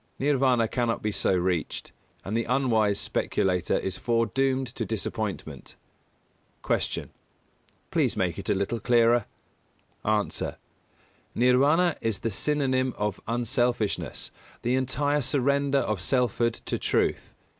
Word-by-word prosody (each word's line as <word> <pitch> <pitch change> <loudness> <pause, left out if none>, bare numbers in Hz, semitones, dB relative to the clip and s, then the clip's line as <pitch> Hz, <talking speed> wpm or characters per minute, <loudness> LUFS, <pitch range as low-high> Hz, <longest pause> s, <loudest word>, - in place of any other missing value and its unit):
Nirvāna 130 -4 +3
cannot 120 0 -1
be 105 - 0
so 100 -1 +1
reached, 90 -2 -1 0.3
and 100 - -3
the 115 - 0
unwise 115 -6 +2
speculator 90 -2 0
is 95 -1 -3
foredoomed 130 +3 +1
to 115 - -3
disappointment. 105 - -4 0.9
244. - - 0
Q. - - -21 0.8
Please - - +1
make - - 0
it - - -5
a - - +3
little 100 +4 -1
clearer? 120 0 +3 0.8
A. 105 -1 +2 1.1
Nirvāna 140 +8 +4
is 115 -3 0
the 115 - -3
synonym 130 +1 0
of 105 -2 -2
unselfishness, 120 -1 -1 0.3
the 120 - +1
entire 140 +3 +1
surrender 140 +1 +1
of 105 -8 0
selfhood 120 0 +1
to - - -2
truth. - - 0
120 Hz, 120 wpm, -27 LUFS, 105-130 Hz, 1.1 s, Nirvāna